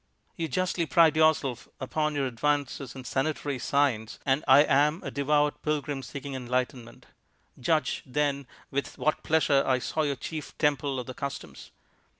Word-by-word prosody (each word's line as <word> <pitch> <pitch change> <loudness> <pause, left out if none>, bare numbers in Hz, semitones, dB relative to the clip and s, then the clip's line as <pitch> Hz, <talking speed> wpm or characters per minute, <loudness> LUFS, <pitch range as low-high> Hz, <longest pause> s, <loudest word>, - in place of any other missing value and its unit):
"You 165 -2 -2
justly 180 +2 -1
pride 160 +3 +5
yourself 155 -6 +2
upon 150 +3 -1
your 140 -1 0
advances 140 +1 -1
in 130 - -8
sanitary 140 +1 -2
science, 125 -6 0
and 135 +2 +2
I 135 +2 +8
am 150 +4 +2
a - - -4
devout 145 +1 +1
pilgrim 145 -2 -2
seeking 135 +2 -7
enlightenment. 125 -1 -3 0.5
Judge, 155 +1 +1
then, 140 0 -1 0.2
with 140 +1 -3
what 155 - 0
pleasure 145 -3 +3
I 130 -1 +2
saw 155 +5 -2
your 145 -2 0
chief 155 +2 -7
temple 145 -3 +1
of 125 - -5
the 130 - -7
customs. 140 +2 -7
140 Hz, 155 wpm, -28 LUFS, 130-150 Hz, 0.5 s, I